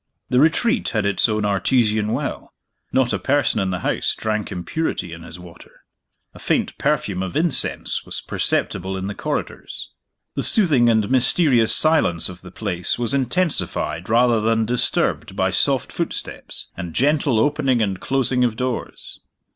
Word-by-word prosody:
The 125 Hz, -, +3 dB
Retreat 230 Hz, -, +2 dB
had 105 Hz, -, 0 dB
its 100 Hz, +3 st, +2 dB
own 105 Hz, -1 st, 0 dB
artesian 105 Hz, +2 st, +1 dB
well; 135 Hz, +4 st, -4 dB, 0.4 s
not 130 Hz, -2 st, +2 dB
a -, -, -1 dB
person 140 Hz, -5 st, +1 dB
in 95 Hz, -1 st, 0 dB
the 90 Hz, -1 st, -3 dB
house -, -, 0 dB
drank 110 Hz, -2 st, -3 dB
impurity 90 Hz, -, -3 dB
in 85 Hz, -, -9 dB
his 85 Hz, +1 st, -10 dB
water. 90 Hz, -1 st, -15 dB, 0.5 s
A -, -, -13 dB
faint -, -, -1 dB
perfume 95 Hz, -2 st, 0 dB
of 95 Hz, -2 st, -3 dB
incense 165 Hz, -4 st, +1 dB
was -, -, -5 dB
perceptible 95 Hz, +2 st, -2 dB
in 95 Hz, -, -4 dB
the 100 Hz, -, -3 dB
corridors. -, -, -5 dB, 0.4 s
The -, -, -2 dB
soothing 145 Hz, -, +4 dB
and 110 Hz, -3 st, +2 dB
mysterious 130 Hz, -2 st, +4 dB
silence 155 Hz, -, +2 dB
of 90 Hz, -1 st, -10 dB
the 90 Hz, -, -11 dB
place 90 Hz, -2 st, -2 dB
was 120 Hz, +1 st, -1 dB
intensified 135 Hz, -, -1 dB
rather 120 Hz, 0 st, +3 dB
than 110 Hz, 0 st, +1 dB
disturbed 120 Hz, +2 st, 0 dB
by -, -, +1 dB
soft -, -, +2 dB
footsteps, -, -, -5 dB
and 85 Hz, -2 st, -7 dB
gentle 140 Hz, -3 st, +2 dB
opening 135 Hz, -1 st, +1 dB
and 100 Hz, -4 st, -1 dB
closing 130 Hz, -1 st, 0 dB
of 120 Hz, -3 st, +1 dB
doors. 125 Hz, +1 st, -5 dB
115 Hz, 155 wpm, -21 LUFS, 95-135 Hz, 0.5 s, soothing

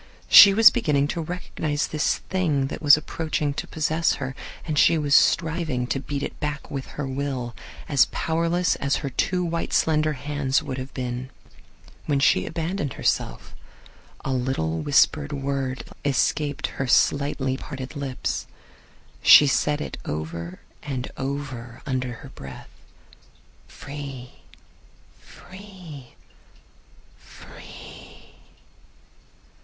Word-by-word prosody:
She 200 Hz, -, +11 dB
was 215 Hz, +2 st, +8 dB
beginning 145 Hz, -11 st, +1 dB
to 170 Hz, -, -2 dB
recognize 155 Hz, -3 st, -3 dB
this 155 Hz, 0 st, 0 dB
thing 155 Hz, -8 st, 0 dB
that -, -, -6 dB
was 145 Hz, -1 st, +7 dB
approaching 155 Hz, -1 st, -2 dB
to -, -, -5 dB
possess 160 Hz, +1 st, 0 dB
her, 130 Hz, -1 st, -5 dB, 0.3 s
and 155 Hz, -3 st, 0 dB
she 165 Hz, -, +5 dB
was 145 Hz, -2 st, 0 dB
striving 160 Hz, -6 st, +2 dB
to 135 Hz, -, -2 dB
beat 140 Hz, 0 st, -4 dB
it -, -, -6 dB
back 150 Hz, -1 st, -4 dB
with 135 Hz, -3 st, -5 dB
her 145 Hz, -2 st, -2 dB
will 130 Hz, -3 st, -4 dB, 0.2 s
— -, -, -16 dB
as 140 Hz, -4 st, +4 dB
powerless 170 Hz, +2 st, 0 dB
as 140 Hz, 0 st, 0 dB
her 135 Hz, -, -3 dB
two 180 Hz, +6 st, 0 dB
white 170 Hz, 0 st, -3 dB
slender 155 Hz, -1 st, +2 dB
hands 145 Hz, +1 st, -1 dB
would 135 Hz, -3 st, -5 dB
have 130 Hz, +1 st, -7 dB
been. 125 Hz, 0 st, -4 dB, 0.8 s
When 145 Hz, -2 st, +1 dB
she 90 Hz, -8 st, +3 dB
abandoned 165 Hz, -2 st, -3 dB
herself -, -, -2 dB, 0.7 s
a 135 Hz, -, -1 dB
little 125 Hz, -12 st, -1 dB
whispered 145 Hz, -, +3 dB
word 135 Hz, -2 st, -3 dB, 0.2 s
escaped 145 Hz, +1 st, 0 dB, 0.2 s
her 135 Hz, -, -1 dB
slightly 135 Hz, +1 st, +2 dB
parted 135 Hz, 0 st, -7 dB
lips. 140 Hz, -3 st, -3 dB, 0.7 s
She 150 Hz, -, +9 dB
said 145 Hz, +2 st, +1 dB
it -, -, -6 dB
over 85 Hz, +4 st, -5 dB, 0.2 s
and 130 Hz, -3 st, -5 dB
over 130 Hz, -4 st, -5 dB
under 130 Hz, -2 st, -2 dB
her -, -, -10 dB
breath: 65 Hz, -, -11 dB, 1.0 s
"free, 140 Hz, -3 st, -8 dB, 0.9 s
free, 180 Hz, -9 st, -13 dB, 1.0 s
free!" -, -, -14 dB
140 Hz, 125 wpm, -24 LUFS, 130-155 Hz, 1.0 s, She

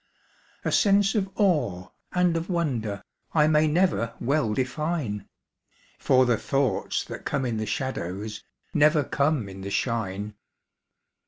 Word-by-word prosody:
A -, -, +1 dB
sense 200 Hz, -1 st, +4 dB
of 200 Hz, -4 st, 0 dB
awe 130 Hz, -, +1 dB, 0.2 s
and 180 Hz, -2 st, +2 dB
of 165 Hz, +2 st, -3 dB
wonder 125 Hz, -, -1 dB, 0.3 s
I 150 Hz, -1 st, +5 dB
may 155 Hz, 0 st, +4 dB
never 155 Hz, -, +1 dB
well 120 Hz, -5 st, +1 dB
define, 130 Hz, -, -2 dB, 0.7 s
For 130 Hz, -1 st, +4 dB
the 120 Hz, -2 st, +2 dB
thoughts 135 Hz, -7 st, 0 dB
that -, -, -8 dB
come 135 Hz, -, -1 dB
in 120 Hz, -3 st, -1 dB
the 110 Hz, 0 st, -3 dB
shadows 105 Hz, -4 st, -4 dB, 0.3 s
Never 150 Hz, 0 st, +4 dB
come 140 Hz, -4 st, 0 dB
in 95 Hz, 0 st, -9 dB
the 100 Hz, -, -5 dB
shine. 105 Hz, -2 st, -2 dB
130 Hz, 135 wpm, -26 LUFS, 105-155 Hz, 0.7 s, I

